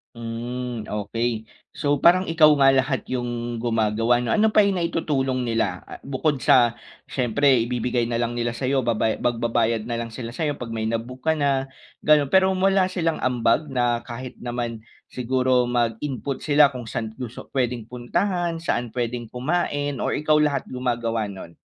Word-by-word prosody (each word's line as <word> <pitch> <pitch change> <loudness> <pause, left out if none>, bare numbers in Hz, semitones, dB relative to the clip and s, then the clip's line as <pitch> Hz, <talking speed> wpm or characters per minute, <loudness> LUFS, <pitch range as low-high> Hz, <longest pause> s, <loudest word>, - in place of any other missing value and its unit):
Hmm, 120 0 -5
okey. 110 +2 -2 0.3
So 145 -1 0
parang 185 +2 +5
ikaw 160 -2 +6
nga 135 -1 +6
lahat 130 -2 +1
'yong 120 -1 -3
gumagawa 115 0 +2
'no? 120 - -1
Ano 215 +1 +4
pa 210 - +7
yung 195 -2 +1
naitutulong 135 -6 -1
nila 115 -6 -1
a - - -10
bukod 140 +1 -1
sa 120 -1 +5 0.3
siyempre 130 0 +2
ibibigay 120 -1 -1
na 120 - -1
lang 120 0 -1
nila 120 0 -2
sa'yo 135 +1 0
babaya 110 -1 +1
magbabayad 115 -1 +1
na 120 - -3
lang 115 - -4
sila 115 0 -7
sa'yo 145 +1 -1
'pag 120 -2 -7
may 110 0 -2
na-book 120 +3 -4
ka 160 - +5
na 135 -2 +1 0.3
gano'n. 150 -2 +4
Pero 190 0 +5
wala 190 0 +3
silang 165 -3 -1
ambag 125 +4 +1
na 120 -2 +1
kahit 125 +1 -8
naman 120 -2 -4 0.3
siguro 125 0 +1
mag-input 125 +3 -2
sila 145 -1 +5
kung 125 -3 -7
saan 110 -2 -4
gusto 125 -1 -8
puwedeng 125 -3 -1
puntahan 170 - -1
saan 120 -7 -1
puwedeng 120 0 -3
kumain 145 +1 -1
o - - 0
ikaw 150 +1 +2
lahat 145 -2 +1
gumagawa 120 -4 -1
no'n? 95 -4 -9
125 Hz, 165 wpm, -23 LUFS, 115-140 Hz, 0.3 s, pa